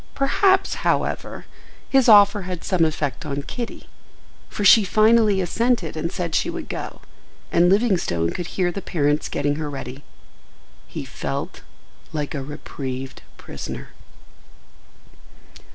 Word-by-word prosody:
Perhaps, 375 Hz, +8 st, +3 dB
however, -, -, -1 dB, 0.4 s
his 265 Hz, -3 st, +4 dB
offer 205 Hz, -1 st, +7 dB
had 180 Hz, -2 st, -6 dB
some 185 Hz, -4 st, +1 dB
effect 150 Hz, -4 st, -2 dB
on 145 Hz, -1 st, -4 dB
Kitty, 235 Hz, -, -6 dB, 0.6 s
for 205 Hz, -, -3 dB
she 220 Hz, +2 st, +8 dB
finally 215 Hz, +1 st, +4 dB
assented 225 Hz, -1 st, 0 dB
and 160 Hz, +2 st, -3 dB
said 175 Hz, -4 st, -4 dB
she -, -, +1 dB
would -, -, -6 dB
go, -, -, -6 dB, 0.5 s
and 175 Hz, +1 st, +4 dB
Livingstone 185 Hz, -, +1 dB
could 175 Hz, -, -4 dB
hear 180 Hz, -1 st, 0 dB
the 195 Hz, -, -5 dB
parents 150 Hz, -4 st, 0 dB
getting 145 Hz, 0 st, -1 dB
her 155 Hz, -1 st, -3 dB
ready. 135 Hz, -1 st, -7 dB, 0.8 s
He -, -, -6 dB
felt -, -, -5 dB, 0.5 s
like 150 Hz, -3 st, -3 dB
a 140 Hz, -, -3 dB
reprieved 135 Hz, -2 st, -6 dB, 0.2 s
prisoner. -, -, -7 dB
175 Hz, 125 wpm, -22 LUFS, 145-210 Hz, 0.8 s, she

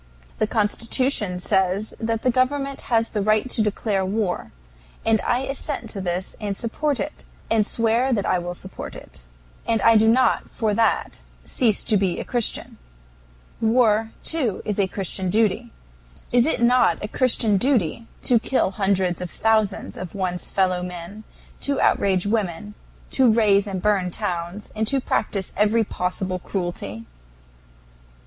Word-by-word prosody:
The 215 Hz, -, +2 dB
Constitution 220 Hz, -1 st, +1 dB
says 190 Hz, +2 st, 0 dB
the 225 Hz, 0 st, 0 dB
government 275 Hz, +2 st, 0 dB
has 230 Hz, -2 st, +2 dB
the 210 Hz, -, -1 dB
right 215 Hz, +4 st, +2 dB
to 225 Hz, -, +1 dB
declare 210 Hz, -1 st, 0 dB
war, 195 Hz, -1 st, -2 dB, 0.5 s
and 225 Hz, -1 st, +3 dB
I 245 Hz, +1 st, 0 dB
assent 270 Hz, -3 st, -4 dB
to 200 Hz, -, -5 dB
this 180 Hz, 0 st, -3 dB
and 200 Hz, -2 st, -2 dB
support 275 Hz, +4 st, -1 dB
it, 300 Hz, -, -5 dB, 0.3 s
and 225 Hz, -1 st, +4 dB
swear 230 Hz, +4 st, +1 dB
that 210 Hz, -5 st, 0 dB
I 185 Hz, -, +1 dB
will 175 Hz, 0 st, -5 dB
support 190 Hz, +2 st, -7 dB
it. -, -, -13 dB, 0.4 s
And 230 Hz, -1 st, +2 dB
I 230 Hz, -1 st, +6 dB
do 220 Hz, +1 st, +4 dB
not 255 Hz, +3 st, +3 dB
for 220 Hz, -3 st, -1 dB
that 225 Hz, 0 st, +1 dB, 0.3 s
cease 220 Hz, -, +1 dB
to 215 Hz, -, +4 dB
be 190 Hz, -3 st, 0 dB
a -, -, -3 dB
Christian. 240 Hz, -3 st, -1 dB, 0.8 s
War, 225 Hz, -1 st, +3 dB
too, 265 Hz, -, -1 dB
is 210 Hz, -1 st, -2 dB
a 195 Hz, -, +3 dB
Christian 190 Hz, -1 st, -3 dB
duty. 215 Hz, +1 st, +1 dB, 0.6 s
Is 245 Hz, +2 st, +4 dB
it 280 Hz, -, 0 dB
not 250 Hz, +1 st, +4 dB
a -, -, -4 dB
Christian 225 Hz, -3 st, +2 dB
duty 230 Hz, -, 0 dB, 0.2 s
to 240 Hz, -2 st, +4 dB
kill 255 Hz, -3 st, 0 dB
hundreds 190 Hz, -3 st, 0 dB
of 180 Hz, -, -4 dB
thousands 215 Hz, -2 st, 0 dB
of 185 Hz, -1 st, -7 dB
one's 180 Hz, -2 st, -2 dB
fellow 185 Hz, -2 st, +1 dB
men, 180 Hz, +4 st, -7 dB, 0.3 s
to 280 Hz, -1 st, 0 dB
outrage 190 Hz, -2 st, +2 dB
women, 205 Hz, -2 st, -2 dB, 0.4 s
to 260 Hz, -4 st, +4 dB
raze 210 Hz, -2 st, +3 dB
and 190 Hz, -2 st, -4 dB
burn 200 Hz, -4 st, +2 dB
towns, 175 Hz, +3 st, -4 dB
and 220 Hz, 0 st, -1 dB
to 275 Hz, +4 st, +2 dB
practice 195 Hz, -6 st, -2 dB
every 215 Hz, +2 st, +3 dB
possible 185 Hz, -1 st, -3 dB
cruelty? 175 Hz, -, -4 dB
210 Hz, 155 wpm, -23 LUFS, 190-230 Hz, 0.8 s, I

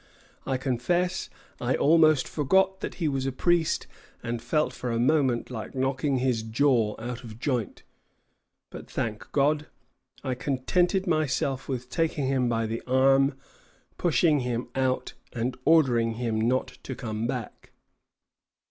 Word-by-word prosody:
I 135 Hz, -1 st, +1 dB
confess 140 Hz, +8 st, -1 dB, 0.3 s
I -, -, 0 dB
almost 155 Hz, -2 st, +4 dB
forgot 190 Hz, +6 st, +2 dB
that -, -, -5 dB
he 165 Hz, -, -1 dB
was 135 Hz, -2 st, -1 dB
a -, -, 0 dB
priest, 170 Hz, +4 st, +1 dB, 0.4 s
and 115 Hz, 0 st, -3 dB
felt 150 Hz, +6 st, 0 dB
for 125 Hz, -, -5 dB
a 115 Hz, -, 0 dB
moment 130 Hz, -1 st, +2 dB
like 115 Hz, +2 st, -6 dB
knocking 135 Hz, +1 st, 0 dB
his 125 Hz, -3 st, +1 dB
jaw 115 Hz, -1 st, +2 dB
out 120 Hz, +2 st, -6 dB
of 110 Hz, -2 st, -10 dB
joint; 125 Hz, -, -2 dB, 0.9 s
but, -, -, -10 dB
thank 110 Hz, -2 st, -4 dB
God, 150 Hz, +1 st, +2 dB, 0.6 s
I 130 Hz, -, -1 dB
contented 175 Hz, +9 st, 0 dB
myself 145 Hz, -5 st, 0 dB
with 125 Hz, -2 st, -3 dB
taking 155 Hz, +1 st, -1 dB
him 130 Hz, -2 st, +1 dB
by 115 Hz, -1 st, 0 dB
the 115 Hz, +1 st, -3 dB
arm, 135 Hz, +1 st, +4 dB, 0.6 s
pushing 165 Hz, -3 st, +3 dB
him 125 Hz, -1 st, -3 dB
out, 130 Hz, -1 st, -1 dB, 0.2 s
and 120 Hz, +1 st, -2 dB
ordering 125 Hz, -8 st, +4 dB
him 115 Hz, -2 st, -1 dB
not 125 Hz, +3 st, 0 dB
to 130 Hz, -, -6 dB
come 110 Hz, -1 st, -3 dB
back." 125 Hz, -3 st, -6 dB
130 Hz, 140 wpm, -27 LUFS, 120-150 Hz, 0.9 s, almost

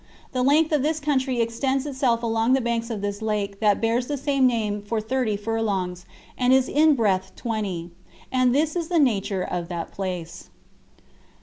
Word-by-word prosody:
The 255 Hz, -, -1 dB
length 300 Hz, +5 st, +3 dB
of 300 Hz, -3 st, +2 dB
this 310 Hz, +2 st, 0 dB
country 265 Hz, -4 st, 0 dB
extends 260 Hz, +4 st, -1 dB
itself 260 Hz, -5 st, 0 dB
along 225 Hz, +2 st, +2 dB
the 265 Hz, -, +4 dB
banks 235 Hz, -1 st, -2 dB
of 220 Hz, -4 st, -4 dB
this 205 Hz, +1 st, -3 dB
lake 205 Hz, -2 st, -2 dB
that 210 Hz, -2 st, +3 dB
bears 230 Hz, +2 st, 0 dB
the 290 Hz, -, -2 dB
same 275 Hz, -1 st, +2 dB
name 215 Hz, -4 st, -1 dB
for 215 Hz, +2 st, -2 dB
thirty 220 Hz, -1 st, -1 dB
furlongs, 200 Hz, -4 st, -2 dB, 0.3 s
and 250 Hz, 0 st, +2 dB
is 260 Hz, -1 st, +4 dB
in 305 Hz, 0 st, +4 dB
breadth 190 Hz, -5 st, 0 dB
twenty, 200 Hz, -7 st, -3 dB, 0.4 s
And 255 Hz, -1 st, +3 dB
this 310 Hz, +3 st, +1 dB
is 340 Hz, -2 st, -2 dB
the 345 Hz, -, 0 dB
nature 205 Hz, -, +1 dB
of 175 Hz, -1 st, -3 dB
that 170 Hz, -1 st, -5 dB
place. 180 Hz, -2 st, -5 dB
230 Hz, 180 wpm, -24 LUFS, 205-265 Hz, 0.4 s, the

